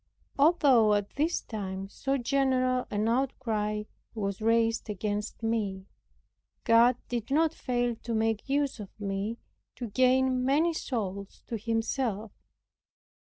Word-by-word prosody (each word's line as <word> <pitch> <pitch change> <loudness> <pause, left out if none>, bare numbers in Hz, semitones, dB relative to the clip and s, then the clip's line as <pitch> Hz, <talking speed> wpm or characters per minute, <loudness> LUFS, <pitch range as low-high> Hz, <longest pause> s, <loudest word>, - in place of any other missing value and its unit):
Although 275 -9 +5
at 205 -1 -2
this 315 +5 0
time 195 -3 -5
so 270 +7 -2
general 255 -1 +1
an 210 +1 0
outcry 225 -4 -1 0.3
was 200 -2 -3
raised 225 0 +2
against 210 +2 -3
me, 205 -4 -1 0.8
God 235 +1 +5
did 235 -1 -3
not 315 +3 +2
fail 245 -5 -1
to 235 0 -4
make 225 +2 0
use 280 -2 0
of 205 -2 -7
me 200 +2 -3 0.4
to 240 -3 -5
gain 255 +1 +3
many 300 +6 +2
souls 200 -9 -4
to 235 - -4
Himself. 225 -1 -2
230 Hz, 120 wpm, -29 LUFS, 210-260 Hz, 0.8 s, Although